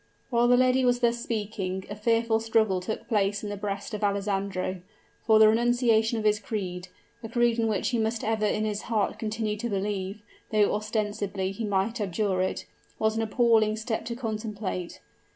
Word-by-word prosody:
While 240 Hz, 0 st, +3 dB
the 245 Hz, 0 st, +5 dB
lady 255 Hz, +1 st, +3 dB
was 245 Hz, 0 st, +2 dB
thus 235 Hz, 0 st, +2 dB
speaking, 200 Hz, -5 st, -3 dB
a 205 Hz, -, -6 dB
fearful 230 Hz, +1 st, +2 dB
struggle 220 Hz, -4 st, +1 dB
took 215 Hz, +4 st, -5 dB
place 205 Hz, -1 st, +1 dB
in 210 Hz, -, -4 dB
the -, -, -3 dB
breast 200 Hz, +1 st, -4 dB
of 210 Hz, 0 st, -4 dB
Alessandro 195 Hz, -2 st, -1 dB, 0.5 s
for 220 Hz, -1 st, +6 dB
the 215 Hz, 0 st, +8 dB
renunciation 230 Hz, 0 st, +3 dB
of 220 Hz, -, -2 dB
his 210 Hz, 0 st, +3 dB
creed, 185 Hz, -5 st, -4 dB, 0.3 s
a 225 Hz, -, -7 dB
creed 240 Hz, 0 st, +2 dB
in 225 Hz, -, +2 dB
which 215 Hz, -3 st, 0 dB
he 240 Hz, -, 0 dB
must 220 Hz, +1 st, -1 dB
ever 215 Hz, -1 st, +1 dB
in 215 Hz, +1 st, 0 dB
his 210 Hz, -1 st, -2 dB
heart 215 Hz, -3 st, 0 dB
continue 215 Hz, -1 st, -2 dB
to 235 Hz, +3 st, -3 dB
believe, 200 Hz, 0 st, -3 dB, 0.3 s
though 210 Hz, -2 st, +3 dB
ostensibly 210 Hz, -2 st, -2 dB
he 220 Hz, +3 st, -4 dB
might 205 Hz, +3 st, 0 dB
abjure 190 Hz, -1 st, 0 dB
it 185 Hz, -, -2 dB, 0.3 s
was 220 Hz, 0 st, +1 dB
an 225 Hz, -, 0 dB
appalling 220 Hz, -1 st, +3 dB
step 220 Hz, 0 st, -3 dB
to 235 Hz, -, -4 dB
contemplate. 215 Hz, -6 st, -4 dB
215 Hz, 185 wpm, -27 LUFS, 200-225 Hz, 0.5 s, the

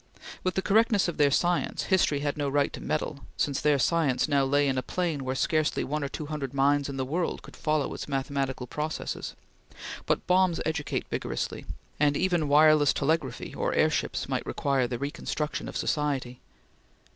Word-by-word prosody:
With 185 Hz, -1 st, 0 dB
the 190 Hz, -, 0 dB
correctness 215 Hz, -1 st, +3 dB
of 175 Hz, -, -3 dB
their 145 Hz, -1 st, +5 dB
science, 175 Hz, +5 st, +1 dB
history 180 Hz, -7 st, +2 dB
had 145 Hz, -1 st, -1 dB
no 145 Hz, -2 st, -1 dB
right 140 Hz, +1 st, +1 dB
to -, -, -7 dB
meddle, 150 Hz, -1 st, -2 dB, 0.2 s
since 140 Hz, -2 st, 0 dB
their 150 Hz, -1 st, +3 dB
science 145 Hz, -2 st, +2 dB
now 140 Hz, -2 st, +3 dB
lay 145 Hz, +1 st, +2 dB
in 130 Hz, -1 st, +1 dB
a -, -, -1 dB
plane 160 Hz, 0 st, -2 dB
where 130 Hz, 0 st, -2 dB
scarcely 155 Hz, +2 st, +1 dB
one 150 Hz, +2 st, -2 dB
or 140 Hz, -, -2 dB
two 155 Hz, -, -5 dB
hundred 145 Hz, -3 st, -5 dB
minds 140 Hz, +1 st, +2 dB
in 135 Hz, -, -5 dB
the 130 Hz, -, -1 dB
world 165 Hz, +6 st, -2 dB
could -, -, -12 dB
follow 155 Hz, -3 st, 0 dB
its -, -, -6 dB
mathematical 135 Hz, -2 st, -2 dB
processes; 150 Hz, +5 st, -4 dB, 0.7 s
but -, -, 0 dB
bombs 180 Hz, -1 st, +3 dB
educate 160 Hz, -2 st, -2 dB
vigorously, -, -, -3 dB, 0.3 s
and 145 Hz, -1 st, +3 dB
even 175 Hz, -5 st, +1 dB
wireless 150 Hz, 0 st, +6 dB
telegraphy 145 Hz, -3 st, -1 dB
or -, -, -1 dB
airships -, -, +1 dB
might -, -, -2 dB
require 135 Hz, -3 st, 0 dB
the 120 Hz, -1 st, -3 dB
reconstruction 145 Hz, +3 st, -3 dB
of -, -, -5 dB
society. 135 Hz, -5 st, -1 dB
145 Hz, 180 wpm, -28 LUFS, 140-160 Hz, 0.7 s, wireless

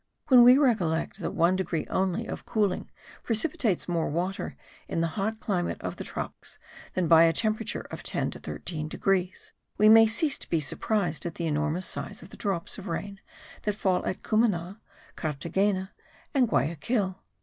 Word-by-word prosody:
When 255 Hz, -2 st, +8 dB
we 250 Hz, +2 st, +8 dB
recollect 205 Hz, -, +1 dB
that -, -, -4 dB
one 170 Hz, +3 st, +3 dB
degree 180 Hz, -4 st, -2 dB
only 190 Hz, +4 st, 0 dB
of -, -, -6 dB
cooling 205 Hz, -5 st, -1 dB, 0.3 s
precipitates 225 Hz, -, 0 dB
more 170 Hz, -2 st, 0 dB
water 180 Hz, +5 st, -3 dB, 0.3 s
in -, -, -2 dB
the 165 Hz, 0 st, +1 dB
hot 220 Hz, +2 st, -2 dB
climate 180 Hz, -6 st, -2 dB
of -, -, -5 dB
the -, -, -5 dB
tropics, -, -, -6 dB, 0.4 s
than 185 Hz, -2 st, +1 dB
by 165 Hz, 0 st, +7 dB
a 165 Hz, -, +4 dB
temperature 215 Hz, +5 st, -1 dB
of -, -, -6 dB
10 -, -, -2 dB
to -, -, -9 dB
13 155 Hz, -3 st, -5 dB
degrees, 185 Hz, +2 st, -1 dB, 0.2 s
we 215 Hz, +1 st, +6 dB
may 225 Hz, 0 st, +8 dB
cease 270 Hz, +6 st, +2 dB
to -, -, -7 dB
be 165 Hz, -, +2 dB
surprised 170 Hz, +4 st, -1 dB
at 170 Hz, -, -6 dB
the 170 Hz, -, -3 dB
enormous 155 Hz, +3 st, 0 dB
size 205 Hz, -, -3 dB
of -, -, -12 dB
the -, -, -10 dB
drops 195 Hz, -1 st, -2 dB
of 200 Hz, -, -9 dB
rain 195 Hz, +4 st, -4 dB, 0.4 s
that 210 Hz, -1 st, -1 dB
fall 190 Hz, -3 st, +1 dB
at 185 Hz, -, -3 dB
Cumana, 205 Hz, -3 st, 0 dB, 0.3 s
Carthagena 190 Hz, +6 st, -1 dB, 0.4 s
and 260 Hz, -5 st, +3 dB
Guayaquil.) 190 Hz, -, 0 dB
190 Hz, 170 wpm, -27 LUFS, 170-215 Hz, 0.4 s, When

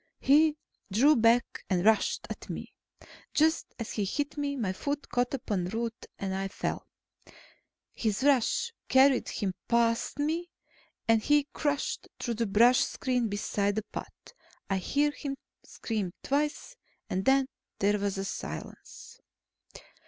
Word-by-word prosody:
He 300 Hz, +3 st, +4 dB, 0.3 s
drew 275 Hz, +10 st, +5 dB
back 235 Hz, +1 st, +3 dB
and 185 Hz, -1 st, +1 dB
rushed 220 Hz, 0 st, +3 dB
at -, -, -8 dB
me. -, -, -6 dB, 0.6 s
Just 320 Hz, +2 st, +3 dB
as 230 Hz, -, -5 dB
he 210 Hz, -, -1 dB
hit 290 Hz, +9 st, -2 dB
me, 285 Hz, -1 st, -2 dB
my 210 Hz, -8 st, -1 dB
foot 285 Hz, +8 st, -3 dB
caught 245 Hz, +2 st, 0 dB
upon 205 Hz, -9 st, -2 dB
a -, -, -5 dB
root, 230 Hz, +2 st, -4 dB
and 195 Hz, -1 st, -3 dB
I 195 Hz, 0 st, -2 dB
fell. 195 Hz, -, -4 dB, 1.1 s
His 220 Hz, +1 st, -1 dB
rush 285 Hz, -, +2 dB, 0.2 s
carried 265 Hz, -1 st, +5 dB
him 195 Hz, -3 st, -2 dB
past 235 Hz, +1 st, +1 dB
me, 320 Hz, +4 st, -1 dB, 0.6 s
and 225 Hz, -1 st, +4 dB
he 295 Hz, +4 st, +4 dB
crashed 290 Hz, -2 st, -1 dB
through 235 Hz, -, -2 dB
the 230 Hz, 0 st, -1 dB
brush 235 Hz, +5 st, +5 dB
screen 250 Hz, -3 st, -1 dB
beside 205 Hz, -1 st, -1 dB
the 215 Hz, -, -1 dB
path. -, -, -9 dB, 0.4 s
I 195 Hz, -, +2 dB
heard 290 Hz, +10 st, +1 dB
him 280 Hz, -2 st, -4 dB, 0.3 s
scream 210 Hz, -6 st, -4 dB
twice, 295 Hz, -, -1 dB, 0.3 s
then 265 Hz, +8 st, +2 dB, 0.3 s
there 205 Hz, +1 st, +2 dB
was 195 Hz, -1 st, -2 dB
silence. 470 Hz, -, -8 dB
235 Hz, 135 wpm, -29 LUFS, 205-285 Hz, 1.1 s, drew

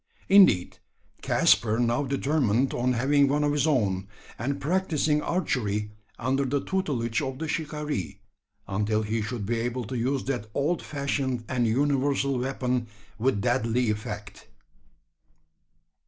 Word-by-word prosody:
Indeed, 190 Hz, -, +5 dB, 0.4 s
Caspar 110 Hz, -1 st, +3 dB
now 120 Hz, +2 st, +1 dB
determined 135 Hz, -3 st, +1 dB
on 125 Hz, +1 st, +1 dB
having 140 Hz, +4 st, +3 dB
one 145 Hz, +2 st, +1 dB
of 145 Hz, -, +2 dB
his 145 Hz, +1 st, +1 dB
own; 100 Hz, -10 st, +1 dB, 0.3 s
and 140 Hz, +5 st, -2 dB
practising 155 Hz, -2 st, +1 dB
archery 105 Hz, -, -1 dB, 0.3 s
under 130 Hz, +3 st, 0 dB
the 140 Hz, +2 st, 0 dB
tutelage 140 Hz, -10 st, -1 dB
of 135 Hz, -2 st, -4 dB
the 160 Hz, +3 st, -4 dB
shikaree, 150 Hz, -, -3 dB, 0.5 s
until 105 Hz, +2 st, 0 dB
he 110 Hz, +1 st, -1 dB
should 105 Hz, 0 st, -4 dB
be 115 Hz, +2 st, -1 dB
able 120 Hz, +2 st, -2 dB
to 125 Hz, -, -5 dB
use 130 Hz, +3 st, 0 dB
that 125 Hz, -6 st, -3 dB
old 155 Hz, +5 st, 0 dB
fashioned 140 Hz, -4 st, -2 dB
and 120 Hz, -2 st, 0 dB
universal 140 Hz, +1 st, +1 dB
weapon 125 Hz, -2 st, -1 dB, 0.3 s
with 115 Hz, -3 st, +1 dB
deadly 120 Hz, -1 st, +1 dB
effect. 105 Hz, -2 st, -6 dB
130 Hz, 130 wpm, -26 LUFS, 115-145 Hz, 0.5 s, Indeed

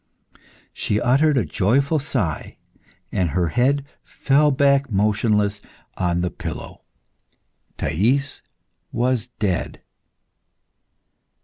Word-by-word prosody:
She 105 Hz, -, -1 dB
uttered 135 Hz, +5 st, +3 dB
a 115 Hz, -, +2 dB
joyful 135 Hz, -, +1 dB
sigh, 110 Hz, -, -3 dB, 0.5 s
and 90 Hz, -3 st, 0 dB
her 85 Hz, +1 st, 0 dB
head 135 Hz, -, +1 dB, 0.2 s
fell 145 Hz, +2 st, +2 dB
back 140 Hz, 0 st, +3 dB
motionless 105 Hz, 0 st, +1 dB, 0.3 s
on 85 Hz, -1 st, 0 dB
the 90 Hz, -, -1 dB
pillow. -, -, -7 dB, 1.0 s
Thais 130 Hz, -, 0 dB, 0.5 s
was 120 Hz, -1 st, 0 dB
dead. 95 Hz, -5 st, -2 dB
120 Hz, 90 wpm, -22 LUFS, 95-140 Hz, 1.0 s, uttered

